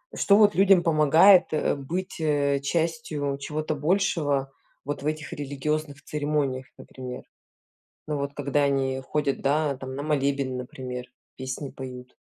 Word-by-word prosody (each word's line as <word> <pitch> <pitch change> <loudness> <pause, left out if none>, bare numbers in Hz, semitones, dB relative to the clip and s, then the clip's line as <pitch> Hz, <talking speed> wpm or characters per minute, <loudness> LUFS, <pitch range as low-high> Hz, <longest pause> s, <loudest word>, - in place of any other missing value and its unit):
что, 200 - +4
вот, 210 -1 +5
людям 195 -1 +6
помогает, 165 +4 +6
э, 155 - +1
быть, 170 +8 -5
э, 145 -2 +2
частью 155 -2 -1
чего-то 155 +2 -3
большего 150 -4 +1 0.3
вот 145 0 -4
в - - -2
этих 155 0 -3
религиозных 145 +1 -3
церемониях, 145 -3 -1
например? 125 -1 -8 0.9
Ну, 150 - -1
вот, 140 0 -3
когда 145 0 +1
они 135 -1 0
ходят, 140 +1 -2
да, 145 0 +1
там, 130 0 -7
на 140 - -4
молебен, 140 -3 0
например, 125 0 -6 0.3
песни 130 +1 -5
поют, 125 -1 -9
145 Hz, 135 wpm, -26 LUFS, 135-155 Hz, 0.9 s, людям